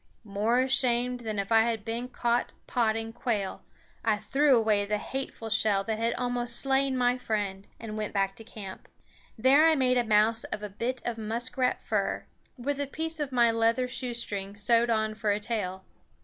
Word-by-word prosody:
More 215 +4 +1
ashamed 250 -1 +2
than 220 -3 -4
if 200 +2 -3
I 225 0 +6
had 225 -2 -1
been 235 +2 -3
caught 240 -1 0
potting 225 -1 0
quail, 210 -6 -2 0.4
I 215 -2 +2
threw 270 +6 +3
away 215 -2 +2
the 210 +1 -1
hateful 235 0 -5
shell 210 -3 +3
that 220 +1 -3
had 230 +1 0
almost 245 -1 -1
slain 270 +1 +1
my 250 0 +2
friend 205 -4 -3
and 225 -2 -6
went 215 -1 -3
back 195 -1 0
to 225 - -9
camp. 205 -4 -9 0.5
There 265 +6 +5
I 320 - +5
made 255 -3 +3
a - - +2
mouse 220 +1 +3
of 210 - -5
a 210 - -4
bit 235 +6 -3
of 235 -1 -3
muskrat 235 +3 -1
fur, - - -1 0.3
with 280 +3 -2
a 285 - -1
piece 320 +3 -3
of 290 -2 -2
my 240 -2 +4
leather 230 +2 +2
shoestring 235 -6 -4
sewed 230 +3 +2
on 220 -1 +1
for 215 0 -2
a 205 0 +2
tail. 205 -4 -3
230 Hz, 185 wpm, -28 LUFS, 215-250 Hz, 0.5 s, I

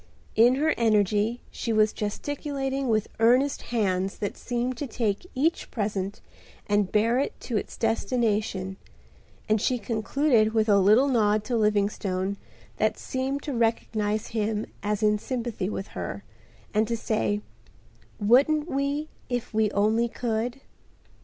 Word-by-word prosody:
In 240 +3 +6
her 310 +3 +2
energy 215 0 +2
she 230 - -3
was 215 -1 +3
gesticulating 270 +4 -3
with 215 -3 +1
earnest 250 +5 +3
hands 195 -5 -1
that 205 - -3
seemed 245 +1 -2
to 290 - -3
take 220 - -2
each 310 +6 0
present 200 -3 -3 0.4
and 205 -2 +1
bear 230 +4 +3
it 280 - -2
to 240 - -4
its 210 - -3
destination, 215 -4 0 0.7
and 215 -1 +2
she 250 +1 +1
concluded 230 +1 +1
with 220 0 +3
a 200 -2 +5
little 215 +8 +5
nod 215 -5 +2
to 240 +3 -2
Livingstone 200 -3 0 0.4
that - - +1
seemed 270 +1 -3
to 290 - -3
recognize 220 -2 0
him 215 -1 -1 0.2
as 210 +1 -1
in 210 0 +3
sympathy 235 -6 -3
with 195 -2 -5
her, - - -5 0.5
and 215 +1 +2
to 235 - -1
say, 210 -2 0 0.8
"Wouldn't 280 +9 +4
we 280 +1 -1 0.2
if 245 -2 -3
we 215 -1 +3
only 215 +4 +2
could?" 240 +2 -2
220 Hz, 140 wpm, -26 LUFS, 210-250 Hz, 0.8 s, In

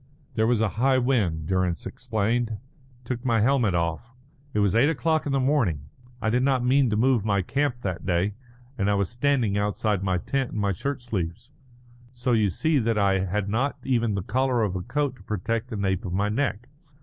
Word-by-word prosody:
"There 110 0 +2
was 120 -2 +2
a 110 - +3
high 135 0 +4
wind," 110 - +1
Durrance 90 -1 0
explained. 115 0 -1
"It 110 - -4 0.5
took 120 0 -4
my 115 -4 +2
helmet 120 -6 +2
off. 85 +9 -2 0.4
It 105 - -4
was 100 -2 +3
eight 130 +6 +5
o'clock 160 +1 0
in - - -1
the 135 - +2
morning. 115 - +1 0.3
I 110 - +1
did 125 +2 +2
not 130 -2 +2
mean 130 0 +4
to 105 - 0
move 120 -1 +3
my 100 -3 +1
camp 135 +2 -1
that 90 -5 -3
day, 95 +2 0 0.5
and 100 0 +2
I 100 - +3
was 100 0 0
standing 120 -5 +1
outside 105 -1 0
my 95 -2 0
tent 135 +7 -2
in - - -4
my 100 -1 +1
shirt 135 +7 -4
sleeves. 100 +1 -4 0.6
So 125 +1 -1
you 110 -4 +3
see 155 - +1
that 115 -2 0
I 100 -2 +3
had 100 +2 -2
not 125 +8 0
even 115 -5 +1
the 95 - -2
collar 130 +1 +1
of 100 -3 -1
a 90 - -2
coat 140 +5 -2
to - - -17
protect 110 +4 -2
the 110 - -5
nape 95 -2 0
of 90 - -4
my 100 +2 +1
neck. 120 -1 -2
110 Hz, 210 wpm, -25 LUFS, 100-130 Hz, 0.6 s, eight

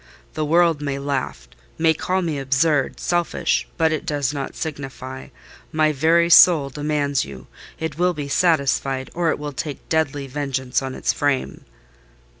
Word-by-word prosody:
The 155 - -2
world 165 -1 +3
may 140 -1 -2
laugh—may 140 - -2
call 185 +4 -1
me 155 -4 -2
absurd, 140 +1 +1
selfish—but 170 -1 0
it 155 - -2
does 145 -2 -1
not 140 -2 -5
signify. 135 -3 -6 0.4
My 155 -1 +2
very 165 +4 +3
soul 160 -4 +7
demands 145 -1 -1
you: 65 -2 -10 0.3
it 160 -1 -5
will 180 0 +2
be 145 -2 -4
satisfied, 140 -4 +1
or 170 -1 0
it - - 0
will 145 -1 -6
take 145 +1 -6
deadly 145 -3 0
vengeance 135 -2 -2
on 130 -1 -5
its - - 0
frame." 145 -2 -1
145 Hz, 145 wpm, -21 LUFS, 135-160 Hz, 0.4 s, soul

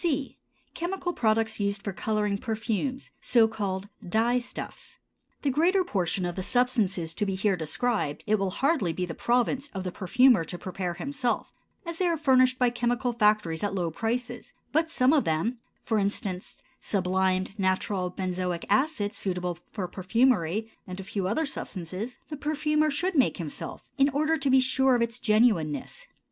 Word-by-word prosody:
C. 285 -5 -1 0.3
Chemical 355 +1 -3
products 220 -2 +1
used 200 0 -1
for 200 - -3
coloring 210 0 -1
perfumes, 230 +4 -2
so 230 -3 +4
called 200 -3 -3 0.2
dye 235 +5 +2
stuffs. 245 - -8 0.5
The 280 - +2
greater 355 +7 +3
portion 185 - -1
of 175 -1 -3
the 190 - -3
substances 200 -7 +1
to 210 - -2
be 195 -2 -1
here 195 +1 +2
described 160 0 -1
it 215 -1 +2
will 195 -1 0
hardly 225 - +1
be 180 +2 -2
the 170 - -5
province 250 - +1
of 190 - -3
the 180 - -3
perfumer 215 +2 +4
to 175 +2 -6
prepare 180 -1 -4
himself, 260 +3 -2 0.3
as 335 0 -5
they 365 - +2
are 335 -1 +1
furnished 260 -3 +4
by 250 -2 +3
chemical 240 +1 0
factories 210 -7 +2
at 200 -1 -1
low 175 -3 -1
prices; 235 +7 -3 0.2
but 320 +2 +2
some 260 -3 +3
of 295 - +4
them—for 220 +6 -2
instance, 195 -2 -3 0.2
sublimed, 190 +1 0
natural 185 0 0
benzoic 180 -1 -3
acid 215 -3 +1
suitable 180 -3 -2
for 180 +2 -6
perfumery 210 +1 +1 0.2
and 185 +1 -6
a - - -5
few 190 0 -2
other 270 +11 +1
substances—the 215 - -5
perfumer 300 +1 +1
should 350 +7 -1
make 265 -4 +3
himself, 160 -6 -6
in 275 +1 +5
order 305 +3 +1
to 285 -3 0
be 265 0 +6
sure 260 0 +3
of 235 - +2
its 235 +1 -4
genuineness. 210 -9 +1
220 Hz, 165 wpm, -27 LUFS, 185-260 Hz, 0.5 s, be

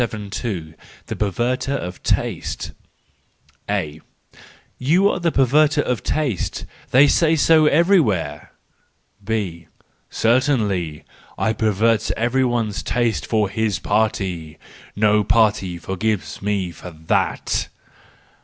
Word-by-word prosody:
The 110 -1 -4 0.6
Perverterof 120 0 -2
Taste. - - -2 1.0
—A: 75 +1 -2 0.8
"You 170 +10 +3
are - - -3
a 170 - +3
perverter 145 +3 +3
of 125 -2 -2
taste—they 135 - 0
say 165 +2 +3
so 155 0 +4
everywhere! 145 - +2 0.4
" 100 - -37
B: 85 -7 -3 0.4
"Certainly! 110 - +1 0.3
I 110 - +1
pervert 110 +1 +1
every 120 +3 +1
one's 115 -5 -1
taste 115 -7 -1
for 110 -2 +1
his 105 +1 -1
party:—no 100 +1 -1
party 105 -5 +2
forgives 95 +4 -3
me 100 -3 -1
for 85 +3 -10
that." 80 -1 -1
110 Hz, 95 wpm, -21 LUFS, 95-130 Hz, 1.0 s, so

